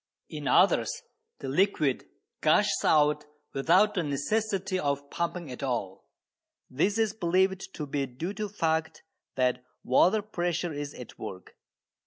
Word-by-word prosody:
In - - -5
others - - +3 0.4
the 135 - -5
liquid 150 -3 +1 0.3
gushes - - +3
out 150 -1 +3 0.3
without 180 +10 +4
the 180 - 0
necessity 190 +6 -1
of 140 -1 -2
pumping 170 -3 -3
at 125 - -8
all. 115 -8 -3 0.6
This 190 +11 +1
is 220 -2 +1
believed 190 0 +1
to 150 - -4
be 140 -1 -2
due 155 +10 -5
to 210 +1 -3
the 200 - -17
fact 160 -3 -1 0.3
that 125 -1 +1 0.2
water 185 - +4
pressure 175 -4 -2
is 145 0 -5
at 125 - -11
work. 95 -1 -8
160 Hz, 140 wpm, -28 LUFS, 140-190 Hz, 0.6 s, without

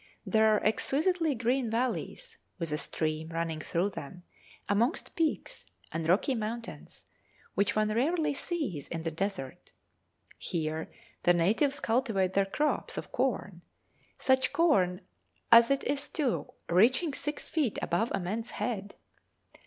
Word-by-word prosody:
There 220 -1 +4
are 215 -1 +3
exquisitely 310 - +2
green 245 +1 0
valleys, 250 - -2 0.2
with 165 -4 -4
a 150 - 0
stream 155 0 -2
running 165 -1 -2
through 180 +6 0
them, 180 +2 -8 0.4
amongst 230 +9 0
peaks, 325 -2 -1 0.2
and 160 0 -2
rocky 200 +9 +3
mountains, 230 0 -6 0.5
which 200 +1 +1
one 215 0 +2
rarely 300 +9 +1
sees 275 - -3
in 165 -1 -4
the 165 - -2
desert. 165 -6 -4 0.7
Here 160 -1 -3 0.3
the 175 - +4
natives 225 - +2
cultivate 225 -6 +1
their 195 0 +3
crops 295 +9 -1
of - - -5
corn - - -1 0.6
such 260 0 +2
corn 195 - +3 0.5
as 230 0 +9
it 275 0 +1
is 285 +1 -1
too, 280 -7 -1 0.2
reaching 255 - +3
six 295 +2 -3
feet 290 -10 0
above 215 +8 0
a - - 0
man's 215 +6 -3
head! 205 -4 -3
220 Hz, 135 wpm, -30 LUFS, 175-270 Hz, 0.7 s, as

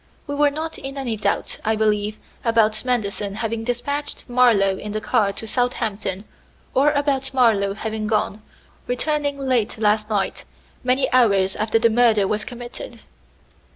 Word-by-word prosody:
We 285 - -4
were 290 0 +3
not 315 +3 -5
in 270 +1 -6
any 250 -5 -2
doubt, 210 - -1
I 220 +1 +1
believe, 215 -1 0 0.3
about 225 -2 +2
Manderson 210 -5 -1
having 225 +1 -2
despatched 285 +5 -3
Marlowe 230 -6 +3
in 210 0 -6
the 215 - -1
car 215 -3 +1
to 225 - -5
Southampton, 215 -5 -2 0.5
or 280 +3 +4
about 280 -2 0
Marlowe 205 -6 +3
having 215 0 -3
gone, 215 0 0 0.5
returning 285 +3 -1
late 255 -6 0
last 215 0 +1
night, 205 -3 -1 0.4
many 260 +1 +2
hours 200 -6 +4
after 215 +1 +1
the 230 0 +3
murder 220 -4 +4
was 210 +1 -1
committed." 245 - -8
225 Hz, 150 wpm, -22 LUFS, 210-255 Hz, 0.5 s, or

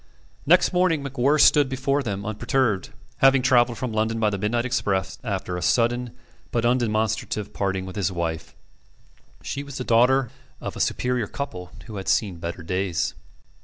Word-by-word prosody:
Next 180 +4 +5
morning 180 -5 +2
MacWhirr 140 +2 +1
stood 145 -2 +6
before 135 +2 0
them 100 -6 -4
unperturbed, 110 0 0 0.3
having 135 -1 +5
travelled 120 -2 +3
from 125 -4 -3
London 110 +1 0
by 105 -2 +2
the 100 - -3
midnight 120 +4 0
express 100 -7 -1
after 95 -5 -3
a - - -5
sudden 120 +2 +1 0.3
but 115 -1 -1
undemonstrative 110 -3 0
parting 95 -1 -2
with 95 - -8
his 100 -1 0
wife. 85 -2 -4 0.9
She 140 - -4
was 140 -1 -8
the 125 - -3
daughter 125 +1 +3 0.3
of - - -6
a - - -7
superior 125 -3 0
couple 90 -11 -6
who 110 -3 -8
had 95 - -6
seen 100 -6 +1
better 85 +1 -5
days. 90 0 -1
115 Hz, 165 wpm, -24 LUFS, 100-130 Hz, 0.9 s, stood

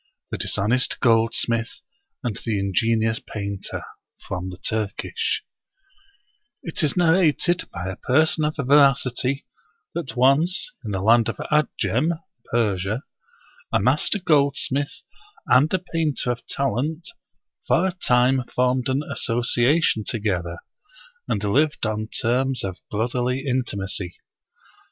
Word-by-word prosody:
The - - -2
Dishonest 120 +6 0
Goldsmith 115 0 +1 0.4
and 115 -4 -2
the 110 -3 -2
Ingenious 110 +3 +1
Painter 100 -2 -5 0.4
From 95 0 -4
the 90 - -8
Turkish 110 - -2 1.2
T 165 - -4
T 160 - +1
IS 145 - -3
narrated 175 0 +3
by 85 +1 -6
a 95 - -5
person 155 +4 +2
of 155 - -1
veracity 135 -1 +3 0.5
that 165 -6 -4
once 150 - +2
in 110 - -5
the 95 -2 -2
land 115 +1 +5
of - - -3 0.2
Adjem 150 - +1 0.3
(Persia) 105 0 0 0.7
a - - +3
master 130 - +2
goldsmith 145 -4 +1 0.4
and 130 +6 +4
a 185 - +3
painter 165 -7 -1
of 120 - -6
talent 140 +5 -2 0.6
for 175 - +3
a 190 - +1
time 130 -6 +2
formed 125 0 +2
an 135 +3 0
association 120 +1 +1
together, 95 -7 -2 0.7
and 100 - -1
lived 140 +7 +1
on 110 0 -2
terms 125 +3 0
of 95 -2 -4
brotherly 125 +4 -1
intimacy. 100 -8 -2
125 Hz, 120 wpm, -23 LUFS, 110-145 Hz, 1.2 s, land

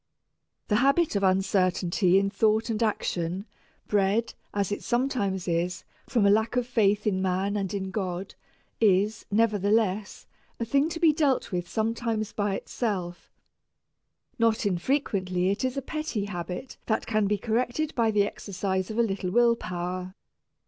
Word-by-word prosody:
The 210 - +2
habit 275 +4 +3
of 200 - +1
uncertainty 185 -1 +2
in 195 0 +1
thought 220 +2 +2
and 215 - -2
action, 185 -4 -1 0.4
bred, 205 +3 +1 0.2
as 200 -1 -1
it 205 - -2
sometimes 240 -8 -1
is, 175 +1 -1 0.2
from 230 -5 +2
a 200 - +6
lack 220 +3 +2
of 250 -1 +1
faith 210 -4 +2
in 190 -3 +1
man 190 +2 0
and 195 -3 -2
in 190 -2 -3
God, 190 -1 -3 0.5
is, 210 0 +2
nevertheless, 210 -1 +1 0.3
a 230 - -1
thing 280 +6 +2
to 330 - -5
be 325 -3 +5
dealt 290 -4 +1
with 175 -1 -3
sometimes 225 -1 -1
by 205 -2 0
itself. 185 -8 -4 1.1
Not 230 -1 +2
infrequently 185 -3 0
it 200 - -2
is 260 +1 -1
a 275 - -2
petty 305 -9 -3
habit 180 +4 -6
that 220 - 0
can 215 -2 +1
be 205 +1 +1
corrected 245 +8 -1
by 230 -2 +2
the 210 -2 +3
exercise 190 -2 -3
of 220 - -5
a 235 - +4
little 195 -4 -2
will 235 +3 +4
power. 180 -1 -5
205 Hz, 155 wpm, -27 LUFS, 190-230 Hz, 1.1 s, a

